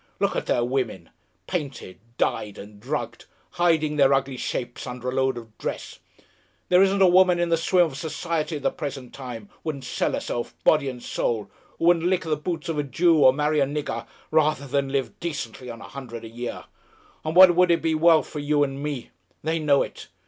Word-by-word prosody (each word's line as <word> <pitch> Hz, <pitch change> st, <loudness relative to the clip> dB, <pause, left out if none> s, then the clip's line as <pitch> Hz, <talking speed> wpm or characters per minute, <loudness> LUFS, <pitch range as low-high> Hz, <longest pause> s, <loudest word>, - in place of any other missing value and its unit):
Look -, -, +1 dB
at -, -, -2 dB
their 120 Hz, -, +2 dB
women! 120 Hz, -9 st, -3 dB, 0.3 s
Painted, 140 Hz, -, -5 dB, 0.2 s
dyed 105 Hz, -2 st, -1 dB
and 105 Hz, 0 st, -11 dB
drugged, 120 Hz, -1 st, -4 dB, 0.3 s
hiding 160 Hz, -3 st, +1 dB
their 135 Hz, -1 st, +5 dB
ugly 135 Hz, 0 st, -1 dB
shapes 120 Hz, 0 st, -4 dB
under 125 Hz, 0 st, -4 dB
a -, -, -2 dB
load 130 Hz, -1 st, +1 dB
of 115 Hz, -2 st, -10 dB
dress! -, -, -5 dB, 0.7 s
There 180 Hz, +1 st, +6 dB
isn't 195 Hz, 0 st, +4 dB
a -, -, +7 dB
woman 180 Hz, 0 st, +5 dB
in 175 Hz, 0 st, 0 dB
the 165 Hz, -, +4 dB
swim 175 Hz, +2 st, +3 dB
of 145 Hz, -5 st, -6 dB
society 160 Hz, 0 st, -2 dB
at 145 Hz, -, -6 dB
the -, -, +2 dB
present 135 Hz, -4 st, -6 dB
time, 120 Hz, -6 st, -8 dB
wouldn't 145 Hz, -4 st, -4 dB
sell 125 Hz, -, -1 dB
herself, 120 Hz, -, -3 dB
body 150 Hz, -3 st, +4 dB
and 125 Hz, -2 st, -8 dB
soul, 105 Hz, -4 st, -2 dB, 0.3 s
who -, -, -1 dB
wouldn't 170 Hz, 0 st, +4 dB
lick 185 Hz, 0 st, +1 dB
the 160 Hz, -2 st, 0 dB
boots 165 Hz, +4 st, -4 dB
of 160 Hz, -3 st, -2 dB
a -, -, +1 dB
Jew 160 Hz, +4 st, +3 dB
or 130 Hz, -2 st, +7 dB
marry 150 Hz, +2 st, +1 dB
a 140 Hz, -, +3 dB
nigger, 140 Hz, -5 st, -4 dB, 0.2 s
rather 155 Hz, -2 st, +2 dB
than 140 Hz, 0 st, -1 dB
live 135 Hz, -4 st, -2 dB
decently 130 Hz, -7 st, -5 dB
on 115 Hz, -1 st, -8 dB
a -, -, -9 dB
hundred 120 Hz, -4 st, -7 dB
a -, -, -8 dB
year! 120 Hz, +1 st, -6 dB, 0.6 s
On 155 Hz, +1 st, -3 dB
what 185 Hz, -1 st, +9 dB
would 175 Hz, -1 st, +4 dB
be 160 Hz, -, +2 dB
wealth 160 Hz, 0 st, +5 dB
for 150 Hz, -, -6 dB
you 145 Hz, 0 st, +2 dB
and 135 Hz, 0 st, -3 dB
me! 145 Hz, -4 st, -4 dB, 0.3 s
They 160 Hz, +2 st, 0 dB
know 145 Hz, -3 st, +3 dB
it. -, -, -9 dB
145 Hz, 205 wpm, -24 LUFS, 125-165 Hz, 0.7 s, what